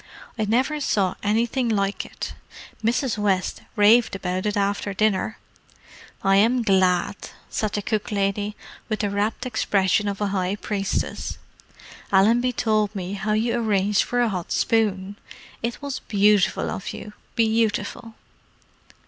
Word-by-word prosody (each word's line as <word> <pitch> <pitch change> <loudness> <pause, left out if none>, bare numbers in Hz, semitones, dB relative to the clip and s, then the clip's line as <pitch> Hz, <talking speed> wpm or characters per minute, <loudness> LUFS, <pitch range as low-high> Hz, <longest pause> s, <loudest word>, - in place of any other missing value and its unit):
I 220 -3 -1
never 260 +8 +1
saw 195 -8 +1
anything 230 +4 +1
like 200 -2 0
it. - - -6 0.5
Mrs. 235 0 0
West 195 -3 0
raved 220 +2 +5
about 185 +1 -2
it 210 - -1
after 200 0 -1
dinner." 215 0 +1 0.9
"I 195 0 +4
am 235 +4 +3
glad," 190 -2 +2 0.4
said 215 -2 -1
the 205 - -2
cook 215 0 -2
lady, 205 +1 -1 0.3
with 215 - -1
the 205 -2 -1
rapt 205 +4 -1
expression 205 -4 +1
of 200 -1 -3
a 205 -1 0
high 185 0 0
priestess. 200 -1 -3 0.7
"Allenby 230 +6 +4
told 215 -3 0
me 185 0 -4
how 205 +2 -1
you 225 +2 +1
arranged 210 -3 +2
for 245 0 0
a 240 - +2
hot 180 -4 -4
spoon. 205 -3 +1 0.4
It 235 +4 -4
was 280 -2 -3
beautiful 205 -1 +2
of 190 - -5
you: 210 - -8 0.2
beautiful!" 225 0 0
210 Hz, 140 wpm, -23 LUFS, 195-225 Hz, 0.9 s, raved